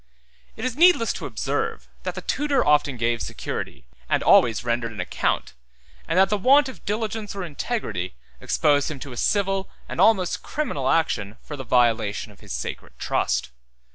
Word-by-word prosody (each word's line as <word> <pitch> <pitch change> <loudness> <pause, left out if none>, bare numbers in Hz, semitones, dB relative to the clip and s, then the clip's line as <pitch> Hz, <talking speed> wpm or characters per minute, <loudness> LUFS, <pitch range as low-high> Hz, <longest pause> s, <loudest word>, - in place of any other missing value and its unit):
It 225 - -5
is 255 -2 -2
needless 340 -7 +5
to - - -5
observe, 450 0 -2
that - - -4
the - - -6
tutor 285 -3 +1
often 145 -3 +3
gave 115 0 0
security, - - -5 0.2
and - - +2
always 115 -1 +5
rendered 120 -1 -1
an 105 - -9
account, 90 - -1 0.5
and 165 - 0
that 190 +1 +5
the 210 0 0
want 275 +7 +5
of 260 - -10
diligence 215 0 -3
or 195 - -4
integrity 145 - -3 0.2
exposed 145 -2 +2
him 155 - -5
to 140 - -7
a - - -7
civil 195 - +1 0.2
and - - -2
almost 195 -5 +3
criminal 145 - -2
action 110 -10 0
for 150 - -7
the 135 - -6
violation 115 -4 +1
of 100 - -19
his - - -12
sacred 60 0 -5
trust. - - 0
155 Hz, 170 wpm, -24 LUFS, -, 0.5 s, needless